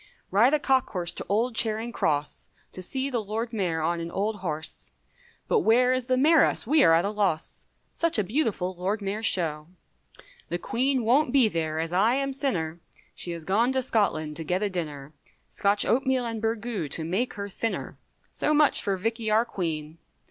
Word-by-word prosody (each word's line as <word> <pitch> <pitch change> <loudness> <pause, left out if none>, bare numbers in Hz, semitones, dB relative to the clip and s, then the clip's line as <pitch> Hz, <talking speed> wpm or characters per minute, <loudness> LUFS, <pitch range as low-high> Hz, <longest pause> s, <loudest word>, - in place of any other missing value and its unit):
Ride 235 +9 +4
a - - 0
cock 265 -2 +2
horse 175 -4 -2
to - - -7
old 230 +5 +1
Charing 225 +1 0
Cross, 150 -9 -2 0.2
To 185 - -8
see 265 +8 -3
the 235 -3 -1
Lord 225 +3 -4
Mayor 175 -7 -1
on 170 +2 0
an 170 0 -5
old 205 +4 -2
horse, 160 -4 -3 0.6
But 460 - +3
where 250 - +4
is 255 -1 -2
the 255 -1 +2
Mayoress 310 +4 +4
we 295 +4 +4
are 165 - +6
at 170 +3 +2
a 200 - -1
loss, 195 -7 -2 0.3
Such 335 -5 0
a 210 - +2
beautiful 200 -5 -1
Lord 195 +4 -2
Mayor's 205 +3 0
Show. 155 -4 +2 0.8
The 175 - -1
Queen 255 +7 0
won't 250 +4 +3
be 260 -4 +5
there, 160 -5 -2
as 165 +1 -3
I 215 +7 +3
am 275 0 -1
sinner, 175 - -2 0.3
She - - -6
has 165 -1 -7
gone 220 +9 +2
to 260 -1 0
Scotland 155 -10 0
to 165 - -3
get 180 +5 -1
a 205 - -1
dinner, 150 -5 -5 0.4
Scotch 200 +1 +2
oatmeal 260 0 +1
and 225 -2 -4
burgoo, 225 -5 -2
to 160 - -1
make 190 +10 -2
her 200 -1 -5
thinner, 225 +3 -4 0.3
So 305 - 0
much 295 -1 +3
for 195 -1 -1
Vickey 225 +3 -2
our 220 +2 +3
Queen. 160 -6 -4
210 Hz, 190 wpm, -26 LUFS, 170-245 Hz, 0.8 s, are